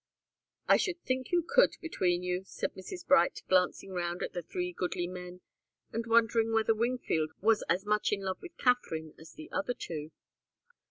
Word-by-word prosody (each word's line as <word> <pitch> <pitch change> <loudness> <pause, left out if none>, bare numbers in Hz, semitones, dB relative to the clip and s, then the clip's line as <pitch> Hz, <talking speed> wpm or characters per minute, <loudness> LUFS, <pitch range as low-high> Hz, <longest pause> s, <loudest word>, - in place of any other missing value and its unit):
"I - - +7
should 365 -3 -1
think 255 -1 -2
you 345 -2 +2
could, - - +5
between 180 - 0
you," 180 0 -1
said - - -3
Mrs. 345 - -8
Bright, 275 - +4
glancing 185 +1 +2
round 175 -1 -2
at - - -4
the 175 - -3
three 180 +2 -4
goodly 175 0 -2
men, 180 0 -8 0.5
and 230 +1 -2
wondering 225 0 +3
whether 225 0 +3
Wingfield 220 -9 -1
was 220 +1 +3
as 190 +3 +1
much 210 0 +1
in 205 -1 0
love 190 -1 -3
with 355 -1 -11
Katharine 165 - 0
as 160 0 -13
the 315 0 -11
other 285 -4 -1
two. 155 -2 -6
205 Hz, 175 wpm, -31 LUFS, 180-250 Hz, 0.5 s, I